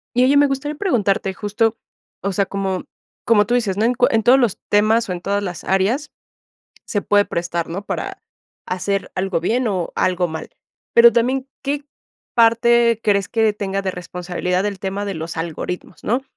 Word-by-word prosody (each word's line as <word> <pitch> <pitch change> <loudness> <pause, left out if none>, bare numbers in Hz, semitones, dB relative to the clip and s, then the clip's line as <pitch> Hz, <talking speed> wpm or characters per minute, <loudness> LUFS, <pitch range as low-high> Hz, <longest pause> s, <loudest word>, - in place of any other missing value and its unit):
Y 250 - +4
oye, 280 +2 +4
me 290 0 +6
gustaría 275 +2 -3
preguntarte 205 - 0
justo 220 +3 0 0.5
o 200 - 0
sea, 195 +1 +1
como 195 -2 -3 0.4
como 210 -3 +4
tú 240 - +1
dices, 220 -6 0
¿no?, 210 - 0
en 240 - +3
cu 250 0 +3
en 225 -1 +1
todos 255 +3 +6
los 240 -7 +1
temas 215 +1 +3
o - - -1
en 180 - -3
todas 200 +1 -1
las 180 -4 -6
áreas 210 +11 +1 0.7
se 205 - -1
puede 205 0 +3
prestar, 170 -1 -3
¿no?, 195 +5 -5
para - - -4 0.5
hacer 195 +2 -2
algo 185 -2 0
bien 235 +8 0
o 185 -5 -2
algo 180 -1 +1
mal. 160 -1 -7 0.5
Pero 235 0 +9
también, 260 +3 0
¿qué 285 +1 -2 0.5
parte 235 0 +4
crees 200 -3 +2
que 225 -2 +2
tenga 195 -1 -3
de 190 -1 -2
responsabilidad 180 +1 -3
el 200 -2 -4
tema 195 +1 -3
de 200 -1 -3
los 160 0 -6
algoritmos, 170 +2 -5
no?, 245 +5 0
205 Hz, 185 wpm, -20 LUFS, 185-235 Hz, 0.7 s, Pero